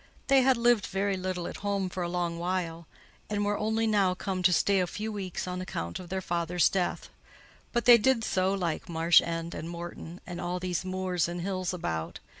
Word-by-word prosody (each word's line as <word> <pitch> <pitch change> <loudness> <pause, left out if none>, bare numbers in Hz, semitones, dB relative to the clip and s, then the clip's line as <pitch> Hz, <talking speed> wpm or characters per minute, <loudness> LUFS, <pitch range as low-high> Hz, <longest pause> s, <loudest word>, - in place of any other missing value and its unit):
They 270 -1 +6
had 260 -1 +4
lived 235 -3 +3
very 195 0 0
little 185 -1 -3
at - - -6
home 200 -2 -1
for 180 0 -5
a 175 - -1
long 175 -1 -2
while, 170 -2 -2 0.4
and 205 -1 0
were 205 0 +1
only 220 +2 0 0.3
come 190 0 -3
now - - -2
to 180 0 +5
stay 195 +3 +3
a 180 - +1
few 215 +5 -4
weeks 190 -4 -4
on 180 0 -3
account 85 - -4
of 180 - -10
their 190 0 -2
father's 170 0 +2
death; 185 -2 -2 0.6
but 240 - 0
they 240 -1 +9
did 240 0 +2
so 190 -2 +1
like 180 -3 -2
Marsh 165 -1 +5
End 165 0 -4
and 165 - -6
Morton, 170 0 -7
and 175 -1 -6
all 180 +1 -2
these 180 -1 -2
moors 185 -3 -1
and 175 0 -4
hills 185 0 -2
about. 80 - -4
185 Hz, 210 wpm, -29 LUFS, 175-200 Hz, 0.6 s, they